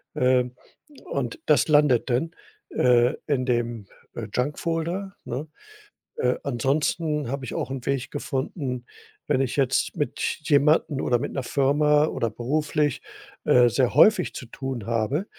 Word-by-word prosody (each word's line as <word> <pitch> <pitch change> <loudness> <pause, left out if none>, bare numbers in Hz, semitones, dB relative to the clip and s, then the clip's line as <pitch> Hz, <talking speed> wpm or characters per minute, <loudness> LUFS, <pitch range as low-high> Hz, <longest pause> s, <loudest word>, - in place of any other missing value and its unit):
ähm, 125 -1 +2 0.5
und 125 -4 -3
das 150 -1 +4
landet 145 -5 +4
dann, 135 +7 0 0.4
äh, 125 +2 +3
in 130 -4 0
dem, 120 -4 -1 0.3
äh, 110 -2 -5
Junk-Folder, 165 +8 -2
ne? 135 +6 -4 0.7
Äh, 125 0 +1
ansonsten 145 +2 0
habe 140 -1 -4
ich - - -6
auch - - -3
'n 130 -3 -5
Weg 135 -2 -2
gefunden, 130 -3 -3 0.4
wenn 130 - +2
ich 130 - -1
jetzt 135 +3 +1
mit 145 - -2 0.2
jemandem 150 -1 +3
oder 120 - +2
mit 145 - -4
'ner 135 - -3
Firma 150 +3 +3
oder 115 -6 -1
beruflich, 145 +4 -1 0.4
äh, 125 -1 +6
sehr 125 +1 +1
häufig 190 +3 +5
zu 125 - -6
tun 130 -2 -6
habe, 115 - -1
135 Hz, 140 wpm, -25 LUFS, 125-150 Hz, 0.7 s, äh